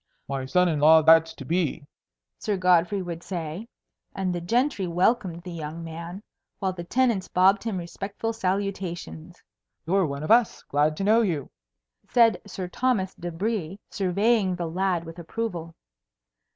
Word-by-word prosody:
"My 135 -1 -3
son 180 +5 +3
in 155 -4 0
law 160 +2 +7
that's 165 +1 +5
to 135 - -9
be," 165 -2 -1 0.5
Sir 210 -2 -1
Godfrey 180 +1 +3
would 170 -2 -6
say. 170 +3 -5 0.5
And 190 -2 -1
the 175 - -3
gentry 230 +1 0
welcomed 175 -1 +1
the 180 - -7
young 165 0 -6
man, 170 +4 -7 0.3
while 190 -2 -1
the 175 -1 -7
tenants 230 -1 +1
bobbed 190 +2 +3
him 225 -4 -2
respectful 195 +6 -4
salutations. 185 -4 -4 0.4
"You're 185 +1 +2
one 140 +1 -5
of 155 - -1
us. 235 -1 +4
Glad 150 +2 +1
to - - -2
know 220 +3 +4
you," 165 - -2 0.6
said 230 -2 +4
Sir 185 -2 -5
Thomas 195 -2 0
de 175 0 -6
Brie, 195 0 -3
surveying 200 +1 +1
the 175 -1 -3
lad 180 +1 0
with 165 +1 -10
approval. 170 -3 -5
180 Hz, 155 wpm, -25 LUFS, 165-200 Hz, 0.6 s, law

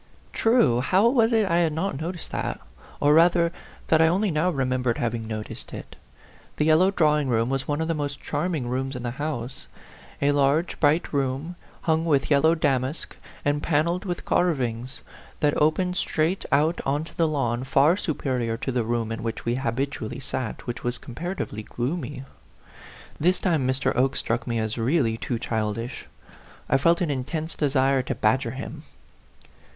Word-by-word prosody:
True! 225 - +3
How 190 - +3
was 235 -2 +3
it 220 -2 +3
I 170 -1 +2
had 165 -3 +2
not 160 -2 -2
noticed 170 +1 -5
that? - - -3 0.4
or, 145 +1 +4
rather, 170 +1 +5 0.4
that 160 0 +5
I 160 - +6
only 190 +4 +1
now 160 +3 +1
remembered 130 -5 0
having 115 -1 -2
noticed 110 -1 -6
it? - - -9 0.6
The 150 - +2
yellow 160 +4 +5
drawing 150 -6 +2
room 115 0 +1
was 135 0 -2
one 145 +1 -1
of 160 - -1
the 165 - +1
most 145 -2 -3
charming 165 -8 -2
rooms 130 +2 -2
in 125 - -5
the 120 - -2
house; 135 -2 -5 0.5
a 140 +1 +3
large, 145 +4 +1
bright 155 +3 +2
room, 140 +5 -1 0.3
hung 160 0 +1
with 145 -3 +1
yellow 160 +4 +5
damask 140 -1 -1 0.3
and 145 0 +1
panelled 170 +4 +1
with 180 -4 -4
carvings, 130 -7 -1 0.4
that 145 -1 +2
opened 180 +4 +2
straight 165 +4 0
out 155 +5 +2
on 145 +3 0
to 160 - -12
the 165 - +2
lawn, 130 -5 -1
far 140 +5 +4
superior 130 - -2
to 130 - -3
the 120 -2 0
room 115 0 -1
in 115 - -4
which 115 -1 -4
we 120 - +1
habitually 130 -1 -2
,sat, 130 -3 -4
which 120 +1 -5
was 120 0 -1
comparatively 165 - -5
gloomy. 135 +4 -4 1.0
This 180 +4 +2
time 160 -8 +1
Mr. 130 0 0
Oke 135 +2 +2
struck 115 +3 -2
me 115 -1 -1
as 110 +1 -2
really 120 -1 +2
too 120 - -2
child 110 -2 -2
ish. 120 +2 -6 0.6
I 135 - +3
felt 170 +5 +3
an 165 -4 +1
intense 155 +5 -3
desire 135 -2 +2
to 130 0 -3
badger 120 +2 +1
him. 130 +3 -7
140 Hz, 175 wpm, -25 LUFS, 125-165 Hz, 1.0 s, I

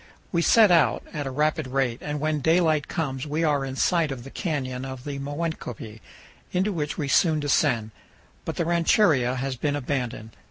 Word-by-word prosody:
We 170 - +1
set 215 +2 +6
out 165 -3 +3
at 145 -3 -3
a - - -2
rapid 150 +1 0
rate, 130 -2 -1
and 150 0 -4
when 155 0 0
daylight 160 0 +2
comes 145 -4 -3
we 155 +3 -1
are 145 -3 +2
in 135 -1 -5
sight 165 +1 +1
of 125 -3 -6
the 135 - -10
canyon 130 -6 -3
of 130 -1 -7
the 140 -1 -5
Moenkopi, 140 -7 -5 0.5
into 190 +3 0
which 150 -4 -3
we 145 - -2
soon 155 +2 +3
descend; 130 -6 +1 0.5
but - - -4
the 170 - -1
ranchería 165 - +3
has 130 +1 -3
been 145 +3 -1
abandoned. 125 -5 -3
145 Hz, 185 wpm, -25 LUFS, 130-160 Hz, 0.5 s, set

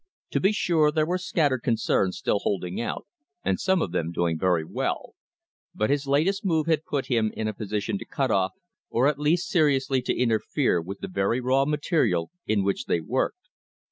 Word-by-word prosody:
To - - +1
be 195 - +3
sure 165 -7 +2
there 155 0 +1
were 180 +3 -1
scattered 145 -8 +1
concerns 110 -5 +1
still 100 - 0
holding 90 -2 -2
out - - -4 0.4
and - - +1
some 190 -3 +2
of 85 - -4
them 85 -2 -1
doing 85 -1 0
very 85 -1 +1
well; - - -3 0.6
but 110 +5 +1
his 140 -1 0
latest 165 +9 +2
move 160 -5 +1
had 160 -2 +1
put 140 -3 -2
him 115 -5 +1
in 110 - -1
a 110 - -2
position 105 - -3
to - - -8
cut 135 -2 -1
off 95 -1 +1 0.4
or 120 - +2
at 145 -1 0
least 160 +4 +1
seriously 135 -5 +2
to - - -1
interfere 115 - +1
with 95 +4 -8
the - - -4
very 100 +6 0
raw 130 +2 +2
material 150 - +1 0.2
in 105 -2 +2
which 100 0 -1
they 85 - +1
worked. 130 - -2
130 Hz, 195 wpm, -26 LUFS, 100-155 Hz, 0.6 s, be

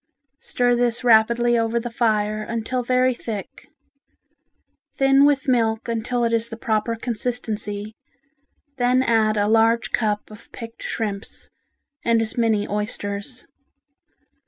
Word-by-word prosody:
Stir 245 0 0
this 240 0 0
rapidly 235 +1 +4
over 230 +1 0
the 240 0 -6
fire 215 -2 0
until 230 +3 -3
very 255 +1 +2
thick. 220 -4 -7 1.3
Thin 270 +1 +4
with 280 -2 +2
milk 225 -2 +1
until 235 +1 -1
it 230 0 +1
is 230 0 +1
the 225 - -7
proper 220 0 -1
consistency, 220 -3 -4 0.8
then 250 +1 +2
add 220 -3 +2
a 205 0 +2
large 225 +1 +3
cup 210 -2 -1
of 215 +2 -14
picked 230 -1 -10
shrimps, 210 -2 -5 0.5
and 230 -1 +3
as 225 -1 -2
many 225 -3 +1
oysters. 205 +3 -4
230 Hz, 125 wpm, -22 LUFS, 215-245 Hz, 1.3 s, rapidly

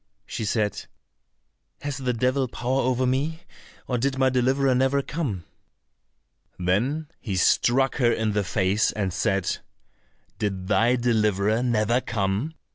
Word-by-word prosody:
She 110 - -4
said, 105 -2 -1 0.9
"Has 145 -1 -3
the 130 -2 -1
devil 130 +3 +1
power 125 +3 -1
over 130 0 +1
me, 145 +6 -1 0.4
or 125 -2 -1
did 135 +2 0
my 130 0 +3
deliverer 130 +1 +2
never 135 +2 +2
come?" 130 - -3 1.1
Then 115 - 0
he 100 -6 -4
struck 125 +8 +3
her 120 -3 +3
in 110 -2 0
the 105 0 0
face, 95 +2 +1
and 100 -4 -2
said, 95 -1 0 0.8
"Did 95 -3 -2
thy 120 +5 +3
deliverer 110 -3 +1
never 120 0 +1
come? 105 +8 -2
120 Hz, 130 wpm, -25 LUFS, 105-130 Hz, 1.1 s, my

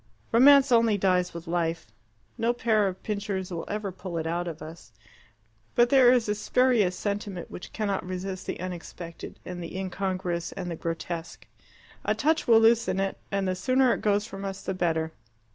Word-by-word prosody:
Romance 275 +3 +7
only 230 -3 +4
dies 180 -2 +2
with 170 0 -8
life. 165 -1 -2 0.4
No 235 0 +1
pair 220 -4 +2
of 190 -1 -6
pincers 200 -3 -3
will 170 -1 -4
ever 205 -1 -3
pull 180 -1 -6
it 160 - -2
out 175 +2 -1
of 165 -2 -5
us. 160 -5 -11 0.8
But 240 0 +5
there 260 -2 +7
is 245 -3 +3
a 210 - +1
spurious 215 -3 +2
sentiment 200 -3 -4
which - - -8
cannot 205 -3 -2
resist 185 +1 -5
the - - -4
unexpected 175 -1 -7
and 175 -1 -6
the 170 +2 -6
incongruous 185 -2 -3
and 180 -3 -5
the - - -3
grotesque. 165 +1 -5 0.6
A - - +1
touch 315 +2 +1
will 225 -2 +7
loosen 225 -3 +3
it, 195 0 -2
and 195 -1 0
the 185 - +1
sooner 255 +6 +3
it - - -4
goes 205 0 +2
from 195 -3 -8
us 195 -1 -5
the - - -2
better. 160 -3 0
190 Hz, 180 wpm, -27 LUFS, 175-220 Hz, 0.8 s, Romance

